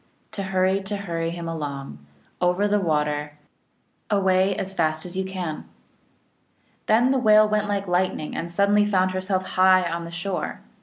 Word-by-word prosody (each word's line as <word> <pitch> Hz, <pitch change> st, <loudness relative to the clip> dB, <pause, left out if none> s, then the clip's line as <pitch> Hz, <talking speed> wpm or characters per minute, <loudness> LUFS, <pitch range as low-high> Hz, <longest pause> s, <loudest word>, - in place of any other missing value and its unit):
To 215 Hz, -2 st, -5 dB
hurry, 190 Hz, 0 st, +1 dB
to 200 Hz, +1 st, -4 dB
hurry 170 Hz, -4 st, -3 dB
him 170 Hz, 0 st, -6 dB
along, 140 Hz, -, -6 dB, 0.4 s
Over 180 Hz, +3 st, +2 dB
the 205 Hz, 0 st, +2 dB
water, 150 Hz, -4 st, -1 dB, 0.8 s
Away 190 Hz, -1 st, +2 dB
as 195 Hz, 0 st, -4 dB
fast 155 Hz, -3 st, 0 dB
as 180 Hz, 0 st, -7 dB
you 190 Hz, -, -1 dB
can! 185 Hz, -5 st, -5 dB, 0.6 s
" -, -, -41 dB
Then 235 Hz, +4 st, +4 dB
the 270 Hz, -, +2 dB
Whale 215 Hz, -2 st, +6 dB
went 210 Hz, 0 st, 0 dB
like 200 Hz, -1 st, -2 dB
lightning, 180 Hz, -3 st, -1 dB
and 170 Hz, -, -4 dB
suddenly 200 Hz, +3 st, +3 dB
found 185 Hz, -2 st, +2 dB
herself 185 Hz, 0 st, -2 dB
high 185 Hz, 0 st, +4 dB
on 170 Hz, 0 st, -4 dB
the -, -, -7 dB
shore. 180 Hz, +2 st, -4 dB
185 Hz, 165 wpm, -24 LUFS, 170-200 Hz, 0.8 s, Whale